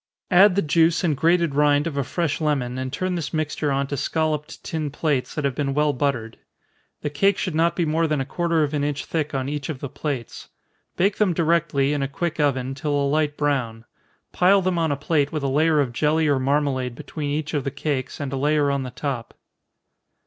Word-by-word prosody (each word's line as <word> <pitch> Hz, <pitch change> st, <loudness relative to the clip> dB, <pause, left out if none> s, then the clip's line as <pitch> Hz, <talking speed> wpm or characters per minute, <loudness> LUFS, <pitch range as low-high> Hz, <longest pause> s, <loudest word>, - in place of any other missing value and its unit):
Add 185 Hz, +1 st, +6 dB
the 200 Hz, -, +2 dB
juice 160 Hz, +2 st, +3 dB
and 160 Hz, -4 st, +2 dB
grated 165 Hz, +1 st, +2 dB
rind 145 Hz, 0 st, +3 dB
of 165 Hz, -4 st, -3 dB
a 140 Hz, -, 0 dB
fresh 165 Hz, +2 st, -2 dB
lemon, 130 Hz, -5 st, -1 dB
and 130 Hz, 0 st, -4 dB
turn 185 Hz, +6 st, -2 dB
this 170 Hz, -4 st, -3 dB
mixture 155 Hz, -1 st, -1 dB
on 140 Hz, 0 st, +1 dB
to 140 Hz, -, -4 dB
scolloped 155 Hz, +1 st, -2 dB
tin 155 Hz, -2 st, -3 dB
plates, 145 Hz, -2 st, -1 dB
that 150 Hz, -, -2 dB
have 140 Hz, -, +1 dB
been 135 Hz, 0 st, -2 dB
well 150 Hz, 0 st, +2 dB
buttered. 125 Hz, -5 st, -2 dB, 0.6 s
The 145 Hz, -, -2 dB
cake 195 Hz, +6 st, +2 dB
should 185 Hz, -, -2 dB
not 165 Hz, +2 st, +2 dB
be 175 Hz, -, +1 dB
more 160 Hz, +1 st, +1 dB
than 150 Hz, -2 st, 0 dB
a 135 Hz, -, -1 dB
quarter 165 Hz, +2 st, 0 dB
of 150 Hz, 0 st, -2 dB
an 145 Hz, -1 st, 0 dB
inch 145 Hz, -1 st, -2 dB
thick 155 Hz, -3 st, -2 dB
on 130 Hz, 0 st, -1 dB
each 145 Hz, +2 st, -4 dB
of 155 Hz, -, -3 dB
the 140 Hz, -, -5 dB
plates. 135 Hz, -5 st, -5 dB, 0.5 s
Bake 195 Hz, +3 st, +2 dB
them 205 Hz, -4 st, +2 dB
directly, 155 Hz, -4 st, +2 dB
in 145 Hz, -, -1 dB
a 135 Hz, -, 0 dB
quick 165 Hz, +4 st, -3 dB
oven, 135 Hz, -3 st, +1 dB
till 145 Hz, +2 st, -2 dB
a 140 Hz, -, +1 dB
light 145 Hz, +1 st, 0 dB
brown. 125 Hz, -6 st, -1 dB, 0.5 s
Pile 190 Hz, +2 st, +4 dB
them 180 Hz, -2 st, 0 dB
on 160 Hz, -2 st, +1 dB
a 140 Hz, -, -1 dB
plate 145 Hz, 0 st, 0 dB
with 155 Hz, -3 st, -3 dB
a -, -, +1 dB
layer 155 Hz, +3 st, +3 dB
of 130 Hz, -4 st, 0 dB
jelly 155 Hz, +4 st, +2 dB
or 140 Hz, -2 st, +2 dB
marmalade 130 Hz, -2 st, 0 dB
between 150 Hz, +2 st, -5 dB
each 150 Hz, +1 st, -2 dB
of 145 Hz, -3 st, 0 dB
the 140 Hz, -, -1 dB
cakes, 140 Hz, -2 st, -3 dB
and 140 Hz, -2 st, -4 dB
a -, -, -1 dB
layer 145 Hz, +1 st, +2 dB
on 140 Hz, -1 st, 0 dB
the 130 Hz, -, -5 dB
top. 125 Hz, -2 st, -5 dB
145 Hz, 225 wpm, -23 LUFS, 140-160 Hz, 0.6 s, Add